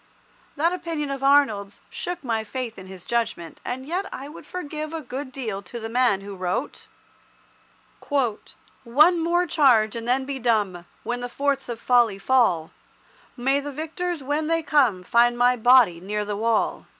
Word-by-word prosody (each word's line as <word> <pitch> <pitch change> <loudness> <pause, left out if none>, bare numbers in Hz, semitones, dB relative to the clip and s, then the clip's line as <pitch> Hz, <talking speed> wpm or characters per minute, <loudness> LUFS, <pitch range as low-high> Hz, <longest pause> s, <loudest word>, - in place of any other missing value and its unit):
That 330 +4 +1
opinion 330 -5 -3
of 275 -1 -4
Arnold's 270 -8 +2
shook 360 -9 -5
my 225 -3 -1
faith 230 -1 -5
in 190 - -11
his 185 -2 -10
judgment, 230 -8 -2
and 260 +1 -5
yet 360 +6 -2
I 275 +2 -7
would 305 - -12
forgive 310 -3 -5
a 325 - -3
good 260 +2 -6
deal 225 -7 -4
to 235 +5 -8
the 225 0 -6
man 240 -4 +2
who 200 0 -8
wrote— 185 +9 -3 1.2
"One 280 +4 +1
more 345 +2 +2
charge 250 -10 +3
and 230 0 -5
then 260 +2 +1
be 275 -1 -4
dumb, 205 -7 0 0.2
When 245 +1 -3
the 245 - -4
forts 275 0 -1
of 235 -1 -4
Folly 235 -4 +3
fall, 195 -8 +2 0.7
May 270 +3 +2
the 290 +1 -5
victors 320 +2 -4
when 295 +3 -1
they 330 0 +1
come 260 -12 +2
Find 240 +4 +3
my 245 +1 +4
body 240 -7 +5
near 210 +3 -3
the 205 0 -3
wall." 225 +1 0
250 Hz, 170 wpm, -24 LUFS, 220-290 Hz, 1.2 s, body